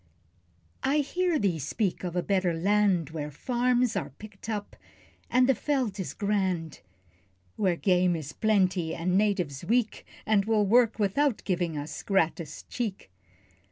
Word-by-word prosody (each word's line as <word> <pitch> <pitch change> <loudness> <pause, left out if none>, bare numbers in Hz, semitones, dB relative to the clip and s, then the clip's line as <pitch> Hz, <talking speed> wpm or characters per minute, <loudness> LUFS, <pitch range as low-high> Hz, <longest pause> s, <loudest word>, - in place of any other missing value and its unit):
I 270 +2 +1
hear 345 +4 +1
thee 190 - 0
speak 185 - -2
of 175 -1 -4
a 180 - 0
better 185 -3 +1
land, 190 -2 +2
Where 150 -2 -4
farms 245 - 0
are - - -2
picked 215 0 -12
up, 210 -2 -4 0.5
and 250 0 +4
the 270 - +5
veld 250 -5 -1
is 190 - -4
grand; 190 -6 -1 0.8
Where 185 -4 +1
game 180 -1 +2
is 155 -2 -6
plenty, 190 -6 +1
and 180 +2 -1
Natives 185 -9 0
weak, 225 +4 0 0.2
And 210 -2 +3
will 215 -2 +2
work 230 +2 +4
without 225 +5 +1
giving 175 -4 -1
us 145 +1 -5
(gratis) 165 -5 -1
cheek. 210 - -5
200 Hz, 145 wpm, -28 LUFS, 175-225 Hz, 0.8 s, the